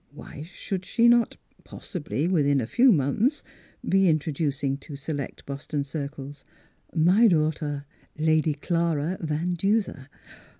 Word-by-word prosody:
Why - - -10
should 185 +3 -5
she 230 +5 +2
not 235 -1 +4
— - - -31
possibly 155 -3 -4
within 145 -6 +2
a 120 - -1
few 250 - +4
months 195 - +1 0.2
— - - -17
be 195 -1 +4
introducing 145 -3 0
to 145 +1 -8
select 140 0 -5
Boston 140 +1 -4
circles, 140 0 -7 0.3
" - - -31 0.2
my 225 +5 +6
daughter, 155 -4 0 0.3
Lady 155 0 +2
Clara 165 +1 -1
Van 160 +2 -1
Duser." 185 -6 -1
155 Hz, 135 wpm, -26 LUFS, 145-185 Hz, 0.3 s, my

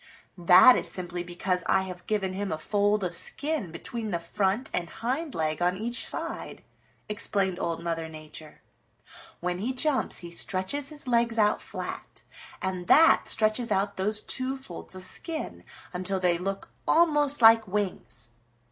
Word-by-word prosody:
"That 185 +8 +8
is - - -1
simply 175 -1 -2
because 180 +1 -2
I 190 - +3
have 180 -1 -9
given 195 -3 -1
him 200 0 -3
a 155 - -1
fold 205 +4 +1
of 180 -1 -2
skin 285 - 0
between 220 +7 -5
the 175 - 0
front 195 +8 -1
and 170 -1 -2
hind 265 +7 -3
leg 155 0 -1
on 180 +1 +1
each 235 +3 -4
side," - - -5 0.4
explained 195 -3 -1
Old 165 0 -2
Mother 165 -1 -3
Nature. 155 0 -11 0.8
"When 180 +1 -2
he 240 +6 -2
jumps 265 +1 0
he 170 -1 -5
stretches 190 +11 -1
his 295 -3 -4
legs 235 -1 +2
out 210 -1 +3
flat, - - -7 0.4
and 185 -2 -3
that 325 +2 +6
stretches 220 +2 +1
out 200 +1 0
those 210 +3 0
two 260 +3 +1
folds 265 -7 -8
of 185 - -5
skin 315 - -3 0.3
until 185 +2 -2
they 175 -2 +1
look 195 +2 -4 0.2
almost 295 -3 +3
like 225 -1 +7
wings. 185 - -4
195 Hz, 155 wpm, -27 LUFS, 180-235 Hz, 0.8 s, That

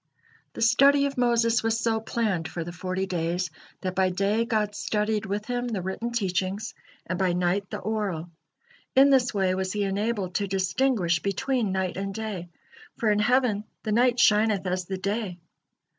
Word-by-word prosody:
The - - -2
study 275 +5 +5
of 280 - -2
Moses 235 -1 +2
was 225 0 0
so 225 -1 +1
planned 215 -7 -1
for 170 - -5
the 175 - -6
forty 185 +2 -3
days, 175 -1 -2 0.3
that 185 -1 -2
by 190 0 +2
day 200 +5 +1
God 215 -3 0
studied 210 0 -1
with 205 +2 -3
him 245 +1 -2
the 210 -6 -3
written 210 +6 -3
teachings, 195 -2 -1 0.3
and 180 +1 -3
by 185 -2 +2
night 180 +3 0
the - - -4
oral. 190 -5 -3 0.6
In 275 +1 +7
this 255 -2 +4
way 190 -2 +1
was 185 0 -2
he 205 -1 0
enabled 200 -1 -1
to 200 +2 0
distinguish 190 -1 +1
between 235 +2 0
night 190 -1 -1
and 195 0 -4
day, 205 -6 -5 0.5
for 220 -2 +2
in 210 - +2
heaven 235 -2 +2 0.2
"the 215 - -2
night 245 +2 +3
shineth 210 -2 +4
as 185 0 -1
the 190 +1 -4
day." 200 -1 -2
205 Hz, 175 wpm, -26 LUFS, 185-230 Hz, 0.6 s, In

